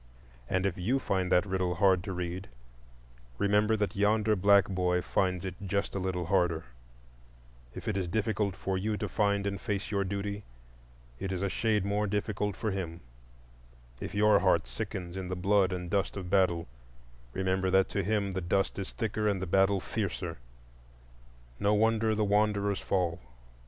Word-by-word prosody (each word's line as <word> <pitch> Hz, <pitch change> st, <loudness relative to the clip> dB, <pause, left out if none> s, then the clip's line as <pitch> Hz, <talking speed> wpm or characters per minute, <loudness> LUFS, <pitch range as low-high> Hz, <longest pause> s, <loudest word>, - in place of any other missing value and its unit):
And 95 Hz, +1 st, +1 dB
if 95 Hz, -2 st, -1 dB
you 115 Hz, +10 st, +1 dB
find 95 Hz, -8 st, -1 dB
that 90 Hz, -, +4 dB
riddle 95 Hz, -2 st, -1 dB
hard 95 Hz, -1 st, +3 dB
to 100 Hz, -, -4 dB
read, 90 Hz, +1 st, -4 dB, 0.9 s
remember 105 Hz, +2 st, +3 dB
that 105 Hz, -1 st, -1 dB
yonder 105 Hz, +1 st, +3 dB
black 100 Hz, +1 st, +5 dB
boy 90 Hz, -2 st, +1 dB
finds 90 Hz, -1 st, 0 dB
it 95 Hz, -, -3 dB
just 100 Hz, +1 st, -1 dB
a 100 Hz, -, -2 dB
little 90 Hz, -2 st, -2 dB
harder; 85 Hz, -3 st, +1 dB, 1.1 s
if -, -, -8 dB
it 110 Hz, -, 0 dB
is 95 Hz, -2 st, -1 dB
difficult 105 Hz, 0 st, 0 dB
for 95 Hz, -1 st, -2 dB
you 105 Hz, +2 st, -1 dB
to 105 Hz, -, -2 dB
find 100 Hz, 0 st, +1 dB
and 100 Hz, -1 st, -2 dB
face 100 Hz, -2 st, -3 dB
your 100 Hz, -1 st, +1 dB
duty, 100 Hz, +1 st, -3 dB, 0.8 s
it 95 Hz, -, -3 dB
is 95 Hz, 0 st, -2 dB
a 100 Hz, -, +1 dB
shade 105 Hz, -1 st, +1 dB
more 105 Hz, +1 st, 0 dB
difficult 105 Hz, 0 st, -1 dB
for 110 Hz, -, -2 dB
him; 85 Hz, -3 st, -4 dB, 1.0 s
if -, -, -6 dB
your 105 Hz, +1 st, +5 dB
heart -, -, +3 dB
sickens 85 Hz, +8 st, -5 dB
in 95 Hz, -1 st, -4 dB
the 95 Hz, -, -3 dB
blood 95 Hz, +1 st, +3 dB
and 90 Hz, -1 st, -4 dB
dust 100 Hz, 0 st, 0 dB
of 90 Hz, -2 st, -6 dB
battle, 90 Hz, -4 st, +2 dB, 0.7 s
remember 95 Hz, 0 st, 0 dB
that 95 Hz, 0 st, +4 dB
to 100 Hz, -, -1 dB
him 100 Hz, 0 st, 0 dB
the 95 Hz, 0 st, -3 dB
dust 95 Hz, +3 st, 0 dB
is 95 Hz, -, -4 dB
thicker 110 Hz, -1 st, -1 dB
and 100 Hz, -2 st, +1 dB
the 95 Hz, -, -3 dB
battle 95 Hz, +2 st, +3 dB
fiercer. 90 Hz, -5 st, -3 dB, 1.2 s
No 105 Hz, +1 st, +3 dB
wonder 110 Hz, 0 st, +2 dB
the 105 Hz, 0 st, +1 dB
wanderers 100 Hz, -1 st, +2 dB
fall! 90 Hz, -3 st, 0 dB
100 Hz, 170 wpm, -30 LUFS, 90-105 Hz, 1.2 s, black